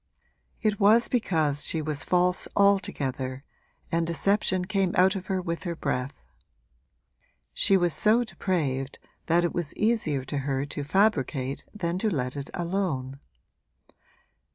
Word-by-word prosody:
It 210 -2 +1
was 220 +3 +5
because 160 - 0
she 165 - -1
was 155 -1 -2
false 180 0 +1
altogether 135 -10 +1 0.5
and 165 0 +1
deception 185 +2 +1
came 195 -2 0
out 185 +2 +5
of 190 0 -5
her 190 -1 0
with 170 -2 -3
her 175 -3 -4
breath; 125 -3 -3 1.3
she 195 - +3
was 175 -3 +2
so 225 +3 +3
depraved 145 - -2 0.3
that 170 +1 +3
it 175 - 0
was 175 -4 -3
easier 210 - +1
to 145 +1 -3
her 135 0 -1
to 145 0 -5
fabricate 140 - 0
than 180 -3 -2
to 220 - +1
let 125 -7 -2
it 140 -1 -5
alone. 170 -7 -2
170 Hz, 135 wpm, -27 LUFS, 140-195 Hz, 1.3 s, was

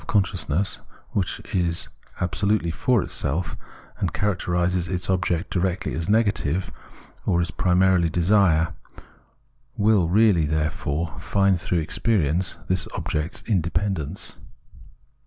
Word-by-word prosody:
Self - - -17
consciousness, 95 -2 0 0.3
which 95 -3 -1
is 85 -2 +1 0.3
abso 90 +3 -1
lutely 100 -5 +2
for 110 +7 +2
itself, 80 +6 -2 0.4
and - - 0
characterises 90 -3 0
its 90 0 -1
object 90 -1 0
directly 95 -2 -1
as 80 +3 -2
negative, 100 -6 +1 0.5
or 85 - +2
is 85 - -1
primarily 90 -1 +3
desire, 85 -2 +3 1.0
will 100 -5 +3
really, 95 -5 +4
therefore, 80 +1 -2
find 100 -3 +2
through 85 -2 0
experience 85 -1 0
this 95 0 0
object's 80 -2 -2
independence. 95 -3 -1
90 Hz, 110 wpm, -24 LUFS, 85-100 Hz, 1.0 s, really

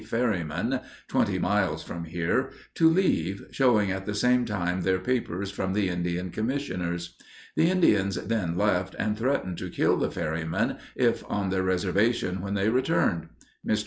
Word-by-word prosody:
ferrymen, 105 -10 -1 0.3
twenty - - +1
miles - - +1
from 85 -1 -6
here, 85 +11 0 0.2
to 165 -1 +5
leave, 165 - +1
showing 110 -7 +3
at 95 +1 -4
the 105 - -2
same 125 +3 +3
time 95 -4 -1
their 95 +1 +2
papers 100 -3 -2
from 95 -1 -2
the 100 -2 +1
Indian 90 0 -2
Commissioners. 90 -9 -3 0.4
The 165 - +4
Indians 105 - +3
then 95 -6 -1
left, 95 -2 +1
and 105 -1 0
threatened 115 -7 -1
to - - -5
kill - - +2
the - - 0
ferrymen 80 0 -2 0.2
if - - +2
on 100 -2 -1
their 95 0 +1
reservation 95 +1 +1
when 100 +1 -3
they 100 +2 +2
returned. 125 - +1 0.3
Mr. 110 - +1
95 Hz, 155 wpm, -27 LUFS, 90-115 Hz, 0.4 s, to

